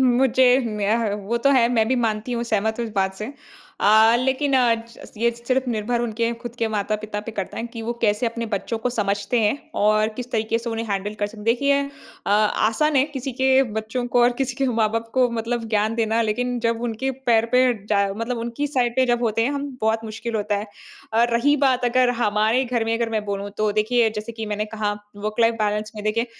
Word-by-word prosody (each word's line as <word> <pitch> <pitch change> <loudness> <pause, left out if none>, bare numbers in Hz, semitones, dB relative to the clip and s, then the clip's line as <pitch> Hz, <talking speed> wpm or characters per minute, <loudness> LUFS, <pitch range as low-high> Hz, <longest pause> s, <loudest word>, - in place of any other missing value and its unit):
मुझे 255 0 +4
मैं 210 0 0
ह 205 - 0 0.2
वो 235 - +1
तो - - +6
है 240 -3 +4
मैं 225 -2 +3
भी 260 - +2
मानती 215 +3 -3
हूँ 235 0 -1
सहमत 220 +2 +1
हूँ 235 - -1
इस 220 - -9
बात 190 -1 0
से। 215 +8 -6 0.5
अ, 220 +3 +6
लेकिन 265 +3 0
अ, 240 -2 +4
च - - -14
ये 235 +1 +3
सिर्फ़ 250 +2 -2
निर्भर 230 +2 -1
उनके 235 0 -1
खुद 240 -1 -7
के 230 -1 0
माता-पिता 210 0 -2
पे 220 +1 -8
करता 190 - -4
है - - -3
कि 230 -1 -9
वो 235 +2 -2
कैसे 210 +2 +2
अपने 230 0 -3
बच्चों 220 +3 -2
को 245 +2 -1
समझते 205 +1 -1
हैं 215 +6 +1 0.2
और 215 +1 +3
किस 245 0 -5
तरीके 225 0 0
से 235 0 -5
उन्हें 225 0 -3
हैंडल 200 +1 -2
कर 205 - +3
सक 215 +1 -12
देखिए 280 +4 +3 0.5
अ, - - 0
आसान 220 +7 +2
है 265 - +5
किसी 265 0 -4
के 265 0 +5 0.2
बच्चों 230 +3 -3
को 245 - +5
और 240 0 +4
किसी 260 -1 -1
के 270 -1 +1
माँ-बाप 225 +1 0
को 255 -1 +4
मतलब 230 +1 -2
ज्ञान 215 0 +1
देना 225 0 +1
लेकिन 245 +3 -1
जब 230 0 0
उनके 240 +3 -2 0.2
पैर 230 -1 +4
पे 255 - +6 0.2
जा 200 -1 +2
मतलब 230 +1 -3
उनकी 235 +5 -3
साइड 250 -4 0
पे 260 -1 +3
जब 240 0 +1
होते 225 -1 +1
हैं 255 - +1
हम 285 0 -3
बहुत 220 +1 0
मुश्किल 225 +1 -5
होता 205 -1 -1
है। 205 +2 -4 0.5
और 235 +1 +3
रही 290 +5 +3
बात 255 -1 +1
अगर 250 0 +3
हमारे 215 +4 +2
घर 240 -2 -1
में 225 - 0
अगर 230 -1 -1
मैं 215 -2 -1
बोलूँ 200 0 -4
तो 215 -1 +1
देखिए, 225 +2 +2
जैसे 215 +2 -6
कि 220 -1 -6
मैंने 210 0 -2
कहा 215 -1 -2 0.2
वर्क 210 +1 -4
लाइफ़ 230 0 +4
बैलेंस 210 0 -1
में 210 - -6
देखिए 230 +3 0
230 Hz, 225 wpm, -22 LUFS, 215-245 Hz, 0.5 s, तो